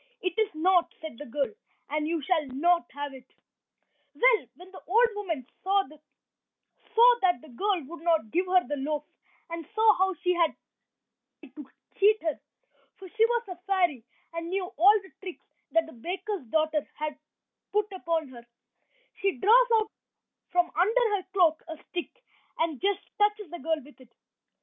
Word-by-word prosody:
"It 365 -2 0
is 435 -2 +3
not," 350 +2 +3
said 315 -7 -8
the 295 - -8
girl, 275 - -2 0.4
"and 300 0 0
you 325 -2 -1
shall 320 -2 +1
not 340 +7 +1
have 285 0 -5
it." 260 -1 -14 0.8
Well, - - +4
when 365 +1 -14
the 380 - -11
old 465 +7 +5
woman 340 - -4 0.2
saw 390 +1 +2 1.4
that 355 -9 +2
the 310 - -15
girl 370 - -1
would 320 +4 -10
not 325 -10 +1
give 360 +2 +1
her 365 0 +3
the 290 - -2
loaf, 295 +2 -2 0.5
and 335 0 -4
saw 440 -1 +6
how 380 0 +2
she 360 +2 0
had 340 -2 +2 0.9
tried 285 -5 -16
to 290 -3 -10 0.3
cheat 420 +2 +5
her, 315 -3 -1 0.6
for 380 -1 -11
she 445 +4 +3
was 475 -1 -1
a 365 - -5
fairy, 350 -11 +1 0.3
and 335 0 -4
knew 380 +1 -3
all 405 +6 +6
the 380 - -15
tricks 370 -3 -9 0.3
that 330 0 +4
the 320 - -13
baker's 365 - -5
daughter 310 +3 +1
had 300 -1 -4 0.5
put 420 0 0
upon 330 -5 -2
her, 240 -2 -13 0.7
she 390 -1 +1
draws 475 - +6
out 435 -1 +1 0.6
from 355 -1 +1
under 440 +5 +3
her 380 - -3
cloak 345 -5 +3
a 320 -1 -7
stick, 365 +8 -6 0.3
and 320 -4 -1
just 400 0 +1 0.2
touches 415 -3 +1
the 345 - -6
girl 320 +2 0
with 290 -2 -17
it. 250 - -17
350 Hz, 170 wpm, -28 LUFS, 305-395 Hz, 1.4 s, saw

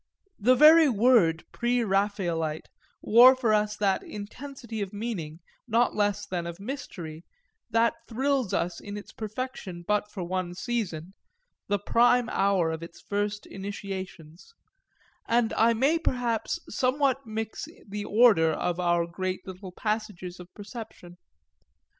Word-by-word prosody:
The 250 +5 +5
very 310 +3 +8
word 210 -8 +4
Pre 240 0 0
Raphaelite 190 -6 -1 0.3
wore 245 +4 +8
for 240 -4 +1
us 210 0 +1
that 200 -2 +1
intensity 230 +2 -7
of 195 -2 -3
meaning, 190 -7 -5 0.3
not 235 +1 +2
less 205 -1 0
than 175 -3 -3
of 170 +1 -7
mystery, 185 - -7 0.5
that 230 +1 +3
thrills 265 -2 0
us 170 0 -1
in 205 0 -7
its 205 - -10
perfection 215 -5 -6
but 210 0 +1
for 195 -3 -6
one 180 0 -3
season, 185 -5 -3 0.5
the 205 - +1
prime 240 +3 +3
hour 195 -4 +2
of 160 +1 -5 0.2
first 205 0 -2
initiations, 190 - -8 0.7
and 235 -1 +2
I 230 +1 +3
may 280 +8 +2
perhaps 245 -7 -1
somewhat 265 +2 0
mix 220 0 -4 0.2
the 205 +1 -5
order 210 -7 +5
of 175 +2 -2
our 175 -1 +2
great 185 +2 -4
little 185 0 -8
passages 205 -3 -4
of 180 0 -12
perception. 205 -5 -10
205 Hz, 130 wpm, -27 LUFS, 180-235 Hz, 0.7 s, very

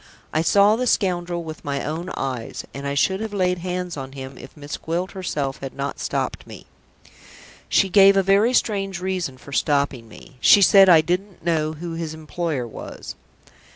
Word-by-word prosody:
I 155 - +2
saw 200 +5 +4
the 250 +2 -1
scoundrel 175 -5 0
with 155 -2 -8
my 140 -1 -3
own 165 +4 -4
eyes, 130 -4 -4
and 140 +1 -5
I 140 - -2
should 190 +7 +1
have 220 -1 -5
laid 180 -2 +1
hands 180 0 -4
on 135 -1 -7
him, 135 -1 -8
if 130 - -13
Miss 145 0 -6
Gwilt 175 +3 -3
herself 150 -8 -3
had 135 -1 -7
not 140 0 -4
stopped - - -3
me. - - -11 1.0
She 195 - +3
gave 195 +1 +6
a 195 - +4
very 200 +6 +3
strange 195 -5 0
reason 180 -7 -3
for 140 - -14
stopping 140 -5 0
me. 110 +4 -15
She 200 - +7
said 195 0 +7
I 165 -3 +8
didn't 180 +2 -3
know 155 -2 0
who 165 +2 -6
his 165 -1 -5
employer 160 -3 -3
was." 110 - -9
170 Hz, 185 wpm, -22 LUFS, 140-190 Hz, 1.0 s, I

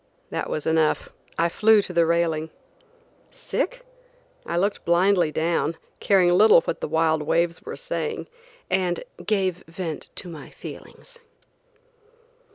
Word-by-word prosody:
That - - -3
was 155 - -3
enough; 160 -1 +1 0.3
I 170 - +3
flew 215 +5 +4
to 180 - -7
the 170 -1 +3
railing. 165 -2 +1 0.8
Sick? - - -4 0.6
I - - -1
looked 200 +3 0
blindly 175 -1 +3
down, 165 0 0 0.2
caring 185 -3 +4
little 200 0 +7
what - - -4
the - - -2
wild 160 0 +2
waves 170 +2 0
were - - -7
saying, 465 -2 -3 0.4
and 180 -2 0 0.2
gave 190 -2 0
vent 165 -2 -5
to 185 - -6
my 160 -4 -9
feelings. 480 - -12
170 Hz, 130 wpm, -24 LUFS, 160-195 Hz, 0.8 s, little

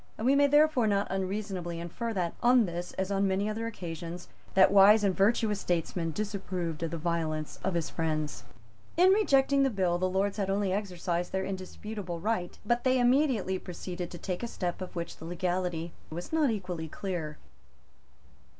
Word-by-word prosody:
We 250 +5 +3
may 285 0 +5
therefore 295 -4 +4
not 200 -1 +2
unreasonably 190 -3 -3
infer 175 +8 -4
that, 175 -4 -1
on 245 -1 +5
this 175 0 -5
as 190 +1 -2
on 195 0 +2
many 195 +2 0
other 225 +2 -2
occasions, 170 -4 -6 0.3
that 190 0 +7
wise 205 +2 +7
and 195 -2 +2
virtuous 210 0 +2
statesman 170 -1 -1
disapproved 185 -4 -3
of 165 - -1
the 165 - -4
violence 160 -2 -2
of 190 -2 0
his 170 -2 -1
friends. 155 -2 -2 0.5
In 365 +2 +7
rejecting 280 -9 +4
the 270 - +4
bill, 185 -6 0
the 185 0 +1
Lords 195 +2 0
had 195 -2 -1
only 195 -1 +1
exercised 180 -3 -2
their 190 0 -1
indisputable 190 -1 -5
right. 185 -2 -2
But 240 +2 +1
they 255 0 +3
immediately 245 -7 +2
proceeded 180 0 -6
to 175 - -8
take 180 0 -4
a 240 - -2
step 180 -5 -3
of 185 - -7
which 170 -1 -4
the 160 - -10
legality 175 -1 -2 0.2
was 175 - -7
not 310 -4 +3
equally 180 -7 -3
clear. 160 -3 -4
190 Hz, 175 wpm, -29 LUFS, 175-215 Hz, 0.5 s, that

